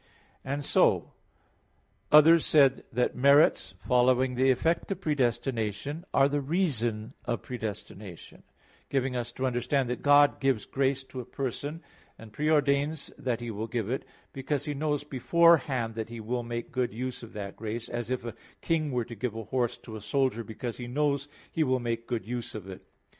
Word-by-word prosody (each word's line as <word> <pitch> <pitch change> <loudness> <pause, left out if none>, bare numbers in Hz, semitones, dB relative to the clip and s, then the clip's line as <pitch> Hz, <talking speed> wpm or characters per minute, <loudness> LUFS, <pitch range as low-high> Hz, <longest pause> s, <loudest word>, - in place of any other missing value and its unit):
And 140 +2 -3
so - - +3 1.0
others 155 +2 +8
said 135 -3 +4
that 125 +2 0
merits 140 -5 +4
following 125 +5 +2
the 130 +2 +3
effect 165 +9 +1
of 190 - -2
predestination 130 - -1
are 135 0 +5
the 145 0 -1
reason 130 - -1
of 120 -1 -2
predestination; 105 -6 -7 0.5
giving 135 -2 0
us 120 -1 -3
to 130 - -2
understand 125 +1 0
that 125 - -3
God 145 0 +5
gives 135 -5 +1
grace 135 0 0
to 130 -1 -9
a - - -4
person, 145 +6 -4 0.3
and 110 -2 -13
pre 150 +7 0
ordains 145 0 +1
that 120 -3 -2
He 120 -1 -4
will 110 +1 -4
give 115 -2 -2
it, 130 - -2 0.3
because 140 +1 -2
He 150 - -2
knows 145 0 -1
beforehand 140 -4 +3
that 110 0 -5
He 120 0 -7
will 120 +3 -2
make 120 0 -5
good 125 -2 -1
use 125 +1 -4
of 115 - -11
that 100 -2 -6
grace, 115 +1 -5
as 120 -1 -4
if 130 -2 -2
a 115 - -4 0.3
king 155 -3 0
were 125 -2 -1
to 120 - -9
give 115 0 -3
a 115 - -4
horse 125 +1 -1
to 110 - -10
a 110 - -7
soldier 125 +1 0
because 115 +2 -6
he 120 - -6
knows 140 +2 0 0.2
he 160 - +1
will 130 -3 +1
make 115 -1 -3
good 115 -5 -2
use 120 0 -5
of 100 -3 -7
it. 95 -1 -9
125 Hz, 180 wpm, -28 LUFS, 115-140 Hz, 1.0 s, others